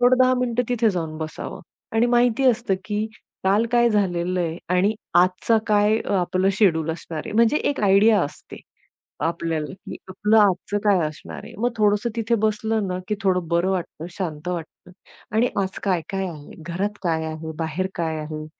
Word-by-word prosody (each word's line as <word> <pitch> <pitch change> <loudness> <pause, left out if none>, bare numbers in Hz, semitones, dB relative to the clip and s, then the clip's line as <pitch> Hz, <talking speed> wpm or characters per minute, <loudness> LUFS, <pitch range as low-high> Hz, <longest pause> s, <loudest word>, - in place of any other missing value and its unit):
थोडं 245 +1 +5
10 255 0 +4
मिनिटं 245 -1 +1
तिथे 235 -2 +2
जाऊन 165 -4 -3
बसावं 155 -1 -6 0.3
आणि 225 +2 +4
माहिती 240 +2 +3
असतं 230 -4 -1
की 210 +2 -1 0.4
काल 205 +4 +3
काय 240 0 +5
झालेलं 180 -3 0
आहे 165 -1 -2 0.2
आणि 200 +4 +2 0.3
आजचा 185 +5 +2
काय 210 +1 +3 0.2
आपलं 185 +1 +1
शेड्यूल 160 -6 +3
असणार 160 -1 -5
आहे. - - -6
म्हणजे 230 +6 +4
एक 285 - -1
आयडिया 205 +1 +5
असते 145 - -7 0.7
आपल्याला, 165 -2 -2
की - - -9
आपलं 210 +4 +1
आजचं 205 0 +2
काय 200 -2 +5
असणार 155 - -9
आहे. - - -11
मग 240 +3 +1
थोडसं 210 +2 +2
तिथे 230 +1 +1
बसलं 215 0 -1
ना, 180 0 -2
की 210 - +1
थोडं 180 -3 +1
बरं 170 +3 +1
वाटतं, 175 -3 -3
शांत 165 -4 -4
वाटतं. 175 0 -6 0.5
आणि 240 +3 +4
आज 190 0 -4
काय-काय 190 0 -1
आहे, 150 -4 -10
घरात 200 +4 -2
काय 165 -3 0
आहे, 160 0 -5
बाहेर 165 +3 -2
काय 160 -2 -2
आहे? 155 0 -6
190 Hz, 170 wpm, -23 LUFS, 170-220 Hz, 0.7 s, थोडं